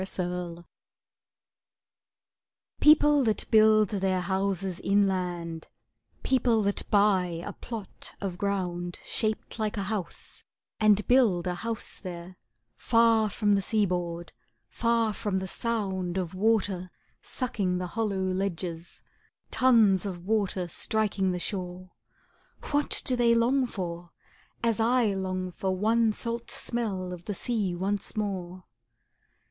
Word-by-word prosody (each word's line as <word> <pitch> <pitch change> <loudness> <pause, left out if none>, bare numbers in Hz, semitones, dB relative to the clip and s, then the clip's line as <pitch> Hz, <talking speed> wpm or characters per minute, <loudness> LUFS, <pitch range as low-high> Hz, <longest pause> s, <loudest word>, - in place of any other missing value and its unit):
INLAND 175 -1 -4 2.1
People 295 -2 +6
that 220 -3 0
build 215 -2 +5
their 190 -2 0
houses 190 -1 -1
inland, 180 -5 0 0.6
People 240 -4 +2
that 200 0 -2
buy 185 -5 +2
a - - -5
plot 225 -5 -8
of 185 -3 -4
ground 180 -3 -2
Shaped 215 +1 -1
like 215 0 -1
a 200 - -1
house, 195 -4 -4 0.4
and 210 -1 +4
build 225 -9 +4
a 180 - -1
house 225 +5 -4
there, 180 -1 -8 0.4
Far 230 -2 +3
from 205 0 +1
the 200 - +2
sea 210 +2 +2
board, 175 -2 -3 0.3
far 230 - +1
from 205 -2 -2
the 190 0 -3
sound 190 -5 -2
Of 180 -2 -3
water 195 -2 +1 0.3
sucking 200 -8 -1
the 180 - -3
hollow 195 0 -2
ledges, 185 -3 -3 0.5
Tons 215 -7 +4
of 175 -2 -7
water 200 -4 0
striking 200 +1 0
the 180 - -2
shore,— 180 0 -3 0.8
What 290 0 +2
do 255 - +2
they 235 -1 +4
long 250 +3 +2
for, 175 -5 -5 0.5
as 230 -1 +1
I 230 -2 +3
long 185 -1 -3
for 190 +1 -2
One 225 +3 +3
salt 235 +2 -4
smell 195 -6 -1
of 175 -1 -10
the 205 - -3
sea 205 -5 -1
once 195 +3 -1
more? 185 -3 -3
195 Hz, 125 wpm, -28 LUFS, 180-220 Hz, 2.1 s, People